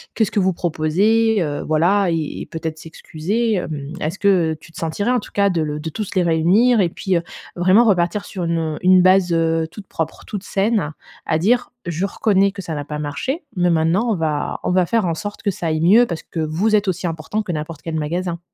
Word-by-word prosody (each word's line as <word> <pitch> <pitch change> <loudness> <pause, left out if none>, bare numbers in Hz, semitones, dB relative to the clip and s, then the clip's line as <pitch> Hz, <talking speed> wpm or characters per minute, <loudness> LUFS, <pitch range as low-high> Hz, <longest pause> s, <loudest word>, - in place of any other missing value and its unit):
Qu'est-ce 220 -4 +1
que - - +1
vous 190 -1 +2
proposez?». 195 +7 +1
Heu, 145 -3 -2
voilà 175 +5 +3
et 160 -3 -2
et - - -5
peut-être 160 -1 -5
s'excuser, 195 +8 -2
hem. 150 -5 -4
Est-ce 170 +1 -3
que, 185 -6 +3
heu, - - -8
tu 170 - -15
te - - -14
sentirais, 170 +8 -1
en 250 - +2
tout - - -12
cas, 200 0 +3
de 175 -4 0
le 150 -1 -2
de 160 - -4
tous 205 +5 -5
les 185 - +3
réunir 180 +9 +3
et 185 - +4
puis, 185 +1 -1
heu, 170 - -2 0.3
vraiment 185 +6 +5
repartir 195 0 +1
sur 185 -4 -5
une, 170 0 0
heu, 155 -2 -3
une 185 0 +6
base, 185 -1 +4
heu, 165 -1 +1
toute 195 +3 -11
propre, 160 0 -4
toute 205 -2 -6
saine, 195 -6 0 0.3
à 155 - +1
dire: 240 +9 +1
«Je 170 +2 -2
reconnais 200 -1 +2
que 200 - -6
ça 165 -3 -5
n'a 145 -1 -4
pas 150 +1 -5
marché, 150 - -3
mais 180 0 +3
maintenant, 170 +8 +2
on - - +1
va 155 -4 -2
on - - 0
va 180 0 +3
faire 225 +3 +1
en 165 -2 0
sorte 205 +6 -6
que 205 - +1
ça 175 -2 -4
aille 155 -1 0
mieux 210 +9 +6
parce 170 -8 -5
que 165 - -7
vous 165 +8 +1
êtes 205 0 -2
aussi 180 -1 -1
importants 165 +6 -3
que 200 - -4
n'importe 155 -1 -5
quel 165 -1 -4
magasin.» 170 +3 -2
175 Hz, 235 wpm, -20 LUFS, 160-200 Hz, 0.3 s, une